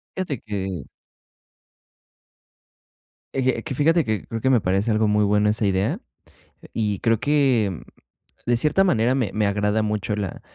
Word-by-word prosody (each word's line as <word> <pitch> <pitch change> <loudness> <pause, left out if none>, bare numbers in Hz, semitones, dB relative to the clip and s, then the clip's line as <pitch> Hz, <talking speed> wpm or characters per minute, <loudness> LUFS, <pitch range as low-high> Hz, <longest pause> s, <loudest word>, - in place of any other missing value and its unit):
Fíjate 155 -10 -3
que 95 -3 -4 2.5
Eje, 130 -1 0
que 150 - -5
fíjate 160 +4 +3
que 110 -3 -2
creo 115 - -5
que 130 - +1
me 125 -3 +4
parece 95 +4 0
algo 110 0 +2
muy 105 0 +2
bueno 105 +1 +3
esa 105 0 0
idea 95 0 0 0.7
y 105 -3 -1
creo 115 +2 +1
que, 130 - +1 0.7
de 120 0 +3
cierta 155 +9 +3
manera 120 - +2
me 130 -6 0
me 105 0 +1
agrada 105 +2 +1
mucho 105 -1 -2
la 100 -3 -4
110 Hz, 150 wpm, -23 LUFS, 105-130 Hz, 2.5 s, me